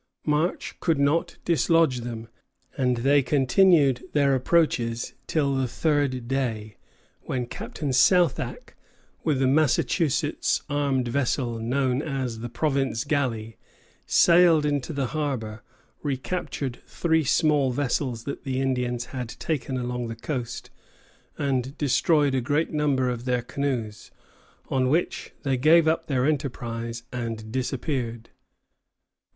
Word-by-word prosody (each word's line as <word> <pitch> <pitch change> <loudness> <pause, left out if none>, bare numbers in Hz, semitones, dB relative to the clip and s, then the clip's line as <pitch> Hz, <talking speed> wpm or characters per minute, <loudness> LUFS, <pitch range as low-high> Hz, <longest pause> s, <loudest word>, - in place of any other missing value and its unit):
March 155 +4 -1
could 165 -3 +1
not 145 +4 +1
dislodge 165 -5 +3
them, 115 -1 -6 0.5
and 125 -2 +1
they 140 +4 +4
continued 140 +1 +3
their 140 -2 +3
approaches 125 -5 +1
till 140 -3 +1
the 130 -1 0
third 140 -3 0
day, 115 -5 -2 0.5
when 125 -2 -2
Captain 140 +4 -5
Southack, 170 +4 +2 0.5
with 145 -4 +1
the 135 - +2
Massachusetts 150 +2 +1
armed 140 -3 0
vessel 120 -2 -1
known 130 +3 0
as 130 -6 -3
the 120 +1 -5
"Province 135 -2 0
Galley," 120 -7 -2 0.5
sailed 170 -3 +5
into 145 -1 -1
the 140 -3 -1
harbor, 125 -8 -3 0.4
recaptured 140 -2 -3
three 160 -2 +1
small 150 -2 +2
vessels 125 -2 -1
that 140 - -6
the 130 -1 -2
Indians 125 -2 -1
had 125 -3 -4
taken 135 -2 -3
along 125 -1 -3
the 115 - -5
coast, 125 0 -5 0.7
and 135 -1 -1
destroyed 145 0 +2
a 130 - +1
great 145 +5 0
number 145 -4 +1
of 120 -1 -3
their 125 -2 0
canoes, 125 -6 -3 0.6
on 130 -1 +1
which 165 +5 -1
they 135 -2 +1
gave 160 +5 +5
up 160 - +1
their 130 -3 +1
enterprise 120 -5 -3
and 115 -3 -5
disappeared. 125 -2 -3
135 Hz, 125 wpm, -25 LUFS, 120-150 Hz, 0.7 s, sailed